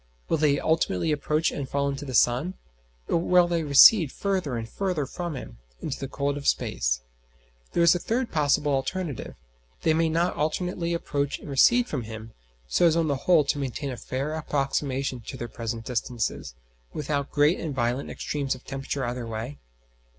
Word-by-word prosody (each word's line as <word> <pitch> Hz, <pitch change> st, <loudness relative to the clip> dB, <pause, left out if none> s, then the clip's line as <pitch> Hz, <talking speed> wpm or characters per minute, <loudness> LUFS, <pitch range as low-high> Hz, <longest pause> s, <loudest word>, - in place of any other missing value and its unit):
Will -, -, +2 dB
they 145 Hz, -2 st, +3 dB
ultimately 160 Hz, -, +1 dB
approach 150 Hz, +2 st, +1 dB
and 135 Hz, -2 st, -5 dB
fall 140 Hz, 0 st, 0 dB
into 140 Hz, +1 st, -3 dB
the 130 Hz, -2 st, -4 dB
sun, 130 Hz, -, +3 dB, 0.5 s
or -, -, +2 dB
will 175 Hz, +1 st, +4 dB
they 170 Hz, -1 st, 0 dB
recede 155 Hz, -, +7 dB
further 185 Hz, -11 st, -1 dB
and 115 Hz, -1 st, -4 dB
further 180 Hz, +1 st, -2 dB
from 170 Hz, +3 st, -5 dB
him, -, -, -9 dB, 0.2 s
into 140 Hz, -, -4 dB
the 135 Hz, -, -4 dB
cold 140 Hz, +1 st, -2 dB
of 140 Hz, -, -5 dB
space? -, -, +1 dB, 0.7 s
There 170 Hz, -, +3 dB
is 170 Hz, -, +7 dB
a 175 Hz, -, -1 dB
third 235 Hz, +6 st, -1 dB
possible 145 Hz, -1 st, +2 dB
alternative: 145 Hz, -, -3 dB, 0.5 s
may 160 Hz, -, +5 dB
they 165 Hz, +1 st, +2 dB
not 170 Hz, +3 st, +1 dB
alternately 170 Hz, +2 st, -1 dB
approach 145 Hz, -3 st, -2 dB
and -, -, -12 dB
recede 240 Hz, -, +5 dB
from 140 Hz, -, -3 dB
him, 110 Hz, 0 st, -8 dB, 0.3 s
so 170 Hz, -, +4 dB
as 165 Hz, -, +3 dB
on 165 Hz, -2 st, +1 dB
the 140 Hz, -, +2 dB
whole 160 Hz, +3 st, +4 dB
to 145 Hz, +1 st, -1 dB
maintain 140 Hz, +1 st, -3 dB
a -, -, -4 dB
fair 135 Hz, +5 st, -3 dB
approximation 135 Hz, -3 st, -1 dB
to 120 Hz, +3 st, -8 dB
their 120 Hz, -, -5 dB
present 115 Hz, 0 st, -5 dB
distances, 115 Hz, -, -3 dB, 0.4 s
without 145 Hz, -1 st, -2 dB
great 150 Hz, +4 st, +3 dB
and 155 Hz, -5 st, -4 dB
violent 120 Hz, +2 st, -1 dB
extremes 140 Hz, -3 st, -2 dB
of 130 Hz, -, -14 dB
temperature 135 Hz, 0 st, -3 dB
either 120 Hz, 0 st, -4 dB
way? 115 Hz, +5 st, -5 dB
140 Hz, 180 wpm, -26 LUFS, 130-160 Hz, 0.7 s, recede